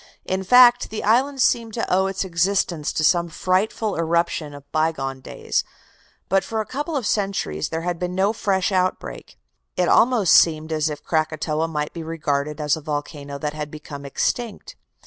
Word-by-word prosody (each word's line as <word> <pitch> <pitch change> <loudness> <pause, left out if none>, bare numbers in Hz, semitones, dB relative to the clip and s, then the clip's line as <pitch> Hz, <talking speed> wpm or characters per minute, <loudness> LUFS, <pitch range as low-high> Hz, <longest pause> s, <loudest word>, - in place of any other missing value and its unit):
In 190 +1 -2
fact, 245 +3 +6
the 220 - -5
island 260 +5 +2
seemed 230 -2 +1
to 230 - -1
owe 190 +1 +2
its 195 0 -2
existence 170 -3 0
to 155 - -1
some 170 +2 +3
frightful 195 +5 0
eruption 165 -2 0
of 145 - -11
by 160 +1 +2
gone 135 -3 -5
days; - - -2 0.6
but 195 0 +2
for 225 - -3
a 215 - -1
couple 295 +8 -4
of 255 - -3
centuries 195 - -1
there 160 - -3
had 175 -1 -2
been 180 0 -3
no 195 +3 +2
fresh 195 -3 0
outbreak. 185 - -2 0.4
It 180 - +2
almost 230 -6 +4
seemed 160 -1 +4
as 155 0 0
if 150 - -7
Krakatoa 155 0 -1
might 150 -2 -3
be 170 - -6
regarded 150 -2 -2
as 150 -1 +1
a 160 - -8
volcano 145 -1 -5
that 150 +1 -3
had 150 -1 -5
become 150 -2 -9
extinct. 215 - -3
170 Hz, 180 wpm, -22 LUFS, 150-200 Hz, 0.6 s, fact